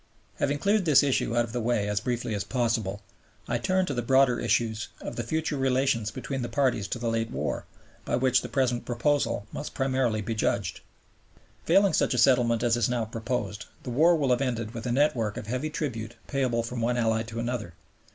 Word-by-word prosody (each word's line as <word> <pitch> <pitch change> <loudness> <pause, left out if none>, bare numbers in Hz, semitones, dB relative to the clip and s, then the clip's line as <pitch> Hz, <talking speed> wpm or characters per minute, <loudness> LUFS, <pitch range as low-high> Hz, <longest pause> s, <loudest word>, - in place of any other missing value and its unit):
Having 145 +1 +1
cleared 200 +4 +2
this 150 -4 +6
issue 130 -4 +1
out 120 - +4
of 115 - -10
the 120 - -1
way 115 -3 0
as 105 0 0
briefly 120 -1 -2
as 100 -1 -1
possible, 110 -5 -1 0.4
I 120 0 0
turn 185 +8 +1
to 145 - -3
the 120 - -1
broader 130 0 +4
issues 115 -2 0
of - - -6
the - - -2
future 155 +5 -2
relations 130 -4 +1
between 135 +3 -4
the 120 - -3
parties 130 -7 +1
to 120 - -3
the 120 0 -3
late 115 0 0
war, - - -3 0.4
by - - -1
which 130 0 +3
the - - -7
present 125 -3 0
proposal 125 -3 0
must - - -6
primarily 130 -5 +1
be 110 +3 -3
judged. 110 - -1 0.9
Failing 195 -1 +4
such - - +2
a - - -1
settlement 120 -2 +4
as 120 -1 +3
is 120 -2 +1
now 120 -2 0
proposed, 110 -3 -4 0.2
the 125 - -5
war 165 +8 +5
will 140 -5 +1
have 125 +1 +2
ended 115 -4 -2
with 115 +1 -5
a - - 0
network 120 -6 +1
of - - -5
heavy 130 +7 -2
tribute 120 -7 -4
payable 125 -4 0
from 115 +1 -4
one 120 +2 +1
Ally 110 -1 +2
to 115 0 -6
another. 115 -7 -3
120 Hz, 210 wpm, -27 LUFS, 115-135 Hz, 0.9 s, this